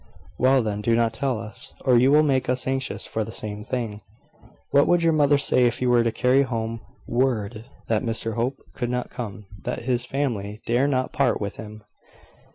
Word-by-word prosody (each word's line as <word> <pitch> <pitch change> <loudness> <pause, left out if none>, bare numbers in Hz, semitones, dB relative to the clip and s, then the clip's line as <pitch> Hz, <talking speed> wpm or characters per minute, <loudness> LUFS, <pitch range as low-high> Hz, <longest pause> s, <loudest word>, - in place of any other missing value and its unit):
"Well, 130 0 +4
then, 105 -1 -2
do 115 +2 +2
not 115 -1 +2
tell 130 +1 -1
us, 110 -1 -8
or 130 -2 +5
you 125 +3 +5
will 150 +1 +6
make 135 -4 +1
us 125 0 0
anxious 135 0 -2
for 110 - -2
the 110 - -7
same 105 -2 -4
thing." 110 -3 -4 0.7
"What 140 0 +5
would 175 -1 +3
your 165 -1 +4
mother 145 -1 +4
say 130 -2 +3
if 120 +1 -2
you 125 -1 +2
were 120 -1 +5
to 115 - +1
carry 125 +4 +3
home 115 -3 -2 0.3
word 120 -3 -1 0.2
that 110 -2 +1
Mr 115 -1 -2
Hope 120 +4 -1 0.2
could 120 -2 -3
not 125 0 -3
come 105 -4 -6 0.2
that - - -4
his 120 -1 0
family 110 -7 -3
dare 120 +4 +2
not 130 -2 0
part 135 -4 +2
with 100 -1 -4
him?" 110 0 -9
120 Hz, 200 wpm, -24 LUFS, 110-130 Hz, 0.7 s, will